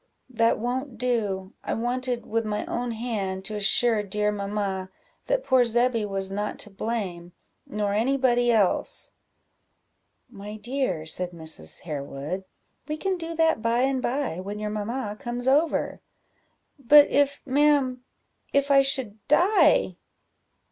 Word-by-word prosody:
"That 230 -1 +2
won't 250 +2 -3
do 210 -6 -1
I - - -2
wanted, 245 +1 -1
with 230 +1 -1
my 210 -1 -2
own 245 0 -3
hand, 200 -5 -3
to 215 - -4
assure 215 +2 +3
dear 210 +1 -1
mamma 200 -2 -3 0.4
that - - +1
poor 260 -2 +4
Zebby 240 -1 +1
was 195 -1 -1
not 205 +1 -3
to 210 - -5
blame, 195 -5 -4 0.3
nor 205 -1 -1
any 245 +6 +2
body 245 -2 +3
else." 210 -5 +1 1.2
"My 210 -3 -9
dear," 225 - -2
said 180 +2 -2
Mrs. 160 - -5
Harewood, 150 +4 -5 0.4
"we 305 0 -3
can 385 +3 -1
do 330 -1 -6
that 320 -7 +2
by 230 +2 +1
and 265 0 +1
by, 255 - -2
when 200 +3 -5
your 210 0 -3
mamma 210 +1 -3
comes 245 +1 -4
over." 300 +5 +2 0.8
"But 290 +3 +7
if, 285 0 +2
ma'am 275 -2 +2 0.5
if 280 0 +2
I 275 0 +7
should 260 -6 -1
die?" 340 - +4
230 Hz, 140 wpm, -26 LUFS, 200-260 Hz, 1.2 s, But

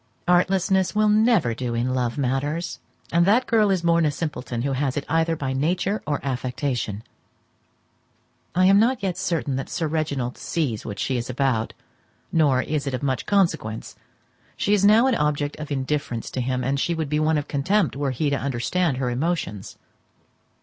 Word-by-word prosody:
Artlessness 190 +2 +2
will 215 0 +3
never 215 - +3
do 120 0 -3
in 125 +2 0
love 125 -1 -1
matters; 145 +5 -2 0.3
and 170 +1 +4
that 235 +5 +4
girl 220 -3 +3
is 185 -3 +1
born 170 0 +3
a 155 - +3
simpleton 140 -6 -4
who 140 - -1
has 135 0 -1
it 145 - -2
either 165 +1 +1
by 135 -3 -3
nature 180 +9 0
or 145 -1 0
affectation. 125 -5 -2 1.5
I 185 +1 +4
am 195 +1 +6
not 235 0 +2
yet 185 -3 0
certain 165 -7 -1
that 135 - -4
Reginald 150 -6 -2
sees 135 -11 -2
what 105 -2 -5
she 130 +5 -1
is 120 +1 -4
about, 125 -3 0 0.6
nor 140 -6 +3
is 150 -2 -2
it 135 - -1
of 130 - -6
much 130 -6 -1
consequence. 160 - 0 0.6
She 205 - +1
is 200 -2 +3
now 215 +4 +6
an 265 - +3
object 150 -4 0
of 155 0 -7
indifference 135 -3 -2
to 130 - -2
him, 130 +1 -1
and 135 +2 0
she 170 +4 0
would 160 -2 -2
be 150 +1 0
one 155 0 +2
of 145 - -3
contempt 175 +5 +1
were 140 0 -1
he 140 +3 -1
to 140 - +1
understand 140 +4 0
her 125 -2 -1
emotions. 130 - -3
145 Hz, 180 wpm, -23 LUFS, 130-175 Hz, 1.5 s, am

